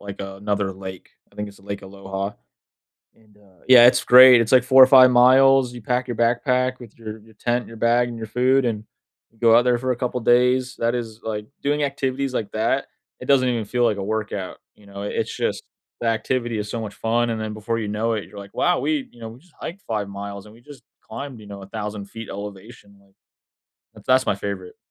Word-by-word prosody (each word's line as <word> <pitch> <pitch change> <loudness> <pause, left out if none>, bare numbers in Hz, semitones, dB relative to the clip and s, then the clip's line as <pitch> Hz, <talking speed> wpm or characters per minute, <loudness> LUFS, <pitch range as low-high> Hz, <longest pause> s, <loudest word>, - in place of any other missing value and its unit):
like, 100 -1 -9
another 100 0 -3
lake. 95 -1 -10 0.2
I - - -24
think 105 0 -4
it's 100 - -15
the 95 - -21
Lake 100 -1 -6
Aloha; 95 +1 -6 0.8
and, 105 -2 -26
uh, 95 -4 -25
yeah, 125 -2 +9
it's 125 0 +3
great, 125 -1 +8
it's 115 - -2
like 130 -2 +6
4 130 0 +8
or - - +6
5 130 -1 +7
miles, 130 +1 +5
you 120 - -9
pack 125 +3 -1
your 120 - -4
backpack 125 +2 +1
with 115 -2 -14
your 110 -1 -8
your 110 +1 -20
tent, 120 +2 -1
your 115 - -12
bag, 120 +1 +2
and 115 - -8
your 110 -1 -7
food, 130 +3 +2
and 110 -3 -2 0.6
go 115 -1 +5
out - - +5
there 125 -1 +2
for 130 +1 -2
a - - -1
couple 125 +1 -3
days. 125 +2 +2
That 115 +1 0
is, 115 -2 -6
like 105 -1 -5 0.2
doing 145 +1 0
activities 135 -1 -2
like 110 -5 -3
that, 115 +5 -1 0.3
it - - -7
doesn't 135 -2 +3
even 120 -2 -1
feel 120 +3 0
like 110 -3 +1
a 100 - -4
workout, 105 -2 -4 0.2
you 105 - -21
know? 100 0 -9
It's 105 - -3
just, - - -2 0.4
the 120 - -1
activity 115 +1 -1
is 105 - -5
so 115 +1 -4
much 105 -2 -7
fun, 120 +1 0
and 110 - -3
then 110 -1 -4
before 110 +2 -3
you 110 - -4
know 105 +3 -1
it, 105 - -4
you're 105 - -15
like, 100 0 -12
"Wow, 180 -1 +1
we 295 -4 -1
you 120 - -18
know, 115 - -7
we 115 +2 -13
just 170 +2 -26
hiked 195 +5 -7
5 105 -3 -3
miles 100 0 -8
and 105 - -15
we 115 - -18
just 145 +2 -15 0.2
climbed, 140 -4 -8
you 105 - -13
know, 100 -1 -9
1000' 105 +1 -7
elevation, 100 +1 -10
like 100 -1 -28 0.8
th - - -15
that's 130 0 +3
my - - +1
favorite. 100 -3 -6
115 Hz, 230 wpm, -22 LUFS, 105-125 Hz, 0.8 s, yeah